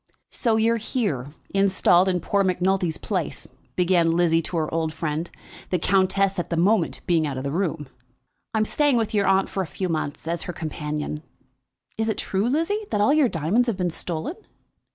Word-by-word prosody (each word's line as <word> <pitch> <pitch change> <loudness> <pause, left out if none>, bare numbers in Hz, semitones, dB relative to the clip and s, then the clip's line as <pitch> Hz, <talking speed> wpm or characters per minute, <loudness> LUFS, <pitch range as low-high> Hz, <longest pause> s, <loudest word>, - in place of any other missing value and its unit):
"So 230 -3 +1
you're 225 +1 +3
here, 165 - -2 0.2
installed 190 -2 +4
in 180 -2 0
poor 200 +4 +1
Macnulty's 185 -2 +1
place," 185 -7 -3 0.3
began 175 -2 +3
Lizzie 165 -1 +3
to 170 +2 -4
her 155 -1 -1
old 160 -1 -1
friend, 155 +1 -2 0.4
the 180 - +1
countess 190 +2 +2
at 175 - -3
the 170 - -1
moment 185 0 +2
being 165 -4 +2
out 135 -2 -4
of 130 - -4
the 140 - -2
room. 160 -4 -2 0.7
"I - - +3
am 215 - +2
staying 290 +1 +2
with 225 -2 -1
your 205 -2 +2
aunt 195 0 +3
for 195 - -2
a 185 - -3
few 185 +5 -3
months, 155 -1 -3
as 170 +1 -1
her 180 - -4
companion. 150 -1 -4 0.8
Is 220 0 +1
it 220 - -1
true, 200 +5 0
Lizzie, 330 +10 0
that - - 0
all 210 +7 +4
your 300 -5 +4
diamonds 185 +10 +1
have 225 -5 -1
been 180 -2 0
stolen?" 170 - -4
180 Hz, 195 wpm, -24 LUFS, 160-205 Hz, 0.8 s, installed